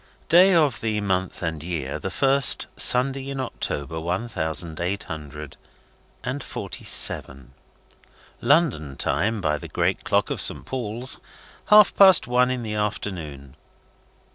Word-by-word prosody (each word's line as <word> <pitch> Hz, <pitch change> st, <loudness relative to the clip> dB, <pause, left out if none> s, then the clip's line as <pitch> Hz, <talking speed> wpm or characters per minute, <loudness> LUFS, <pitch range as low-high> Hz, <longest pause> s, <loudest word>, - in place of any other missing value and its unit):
Day 180 Hz, +3 st, +6 dB
of 150 Hz, -7 st, +2 dB
the 110 Hz, -2 st, -1 dB
month 95 Hz, -2 st, -2 dB
and 80 Hz, -2 st, -3 dB
year, 85 Hz, -1 st, -4 dB
the -, -, -4 dB
first 135 Hz, -1 st, +3 dB
Sunday 135 Hz, +2 st, +3 dB
in 135 Hz, -1 st, -5 dB
October, 80 Hz, -, -4 dB
one 90 Hz, +8 st, -3 dB
thousand 80 Hz, -5 st, -3 dB
eight 95 Hz, +4 st, -2 dB
hundred 75 Hz, -2 st, -9 dB, 0.7 s
and 130 Hz, +3 st, -4 dB
forty -, -, -7 dB
seven. 65 Hz, -1 st, -2 dB, 0.9 s
London 125 Hz, -, +1 dB
Time 110 Hz, 0 st, -1 dB
by 75 Hz, -3 st, 0 dB
the -, -, -9 dB
great -, -, -1 dB
clock -, -, 0 dB
of -, -, 0 dB
Saint -, -, 0 dB
Paul's, 125 Hz, 0 st, -4 dB, 0.5 s
half 210 Hz, -1 st, +6 dB
past 190 Hz, -3 st, +7 dB
one 125 Hz, +1 st, +2 dB
in 130 Hz, -1 st, -3 dB
the 110 Hz, -1 st, -4 dB
afternoon. 85 Hz, -10 st, -5 dB
105 Hz, 140 wpm, -23 LUFS, 80-130 Hz, 0.9 s, past